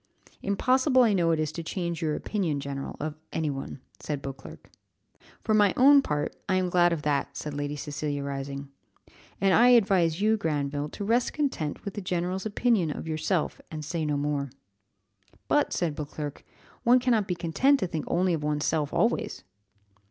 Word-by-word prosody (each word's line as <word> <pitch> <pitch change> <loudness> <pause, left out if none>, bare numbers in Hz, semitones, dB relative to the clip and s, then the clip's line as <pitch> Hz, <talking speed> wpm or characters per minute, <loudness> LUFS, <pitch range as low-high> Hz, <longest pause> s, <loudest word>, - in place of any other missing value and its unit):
"Impossible 255 +6 +3
I 225 -3 +3
know 175 -3 +2
it 165 -1 +2
is 155 -1 -1
to 170 - -5
change 170 0 -3
your 155 -2 0
opinion, 175 -9 -2
general, 140 -1 -5
of 155 0 -3 0.2
any 155 -2 -1
one," 135 -1 -6 0.2
said 150 -2 -3
Beauclerc. 135 -1 -9 0.7
"For 215 - +1
my 205 -3 +4
own 280 +2 +7
part, 150 - -2
I 190 - +3
am 185 -1 0
glad 175 -1 +4
of 160 -3 -2
that," 145 -2 -1
said 150 - -5
Lady 145 0 -3
Cecilia, 145 -1 -3
rising; 140 0 -5 0.7
"and 195 -1 +3
I 240 - +6
advise 195 -9 +4
you, 215 +2 +3
Granville, 145 -4 -2
to 200 - -6
rest 235 +3 +1
content 245 - -2
with 200 - -4
the 205 - -5
general's 185 +2 -2
opinion 215 -5 +1
of 150 - -5
yourself, 160 +1 -1
and 155 -1 -6
say 165 +2 -2
no 150 -1 0
more." 145 -1 -1 1.0
"But," 295 -1 +2
said 170 -4 0
Beauclerc; 150 -1 -6 0.4
"one 245 +2 +5
cannot 240 -5 +2
be 180 - -1
content 215 - +2
to - - +2
think 165 -3 -4
only 180 +1 +1
of 160 - -1
one's 150 0 -1
self 155 -3 0
always." - - 0
165 Hz, 180 wpm, -27 LUFS, 150-200 Hz, 1.0 s, own